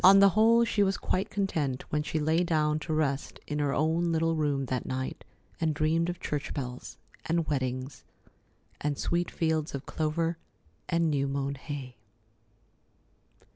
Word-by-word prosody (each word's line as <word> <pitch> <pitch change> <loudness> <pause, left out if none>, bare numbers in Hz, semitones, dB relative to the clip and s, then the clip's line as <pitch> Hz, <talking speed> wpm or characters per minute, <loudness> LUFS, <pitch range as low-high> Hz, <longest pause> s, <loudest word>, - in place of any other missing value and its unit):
On 195 +2 +9
the 200 0 +8
whole, 225 +4 +5
she 215 -2 +1
was 195 -1 +2
quite 185 - -1
content 155 -10 -1
when 150 - +1
she 155 +1 -2
lay 160 +3 +2
down 155 -3 +1
to 160 - -5
rest 150 -3 -1
in 150 0 -3
her 145 -1 +1
own 160 +4 +1
little 165 0 +2
room 145 -3 0
that 130 0 -2
night 130 0 -3 0.4
and 160 -2 +1
dreamed 160 +3 +2
of 175 - -4
church 150 -1 -3
bells, 125 -3 -5 0.3
and 165 0 +1
weddings, 130 -1 -2 0.8
and 145 -1 -1
sweet 175 +1 0
fields 160 -3 0
of 140 - -6
clover 165 +2 -1 0.5
and 170 -1 +2
new 140 -1 +1
mown 140 0 -1
hay. 135 -3 -7
155 Hz, 160 wpm, -29 LUFS, 140-170 Hz, 0.8 s, On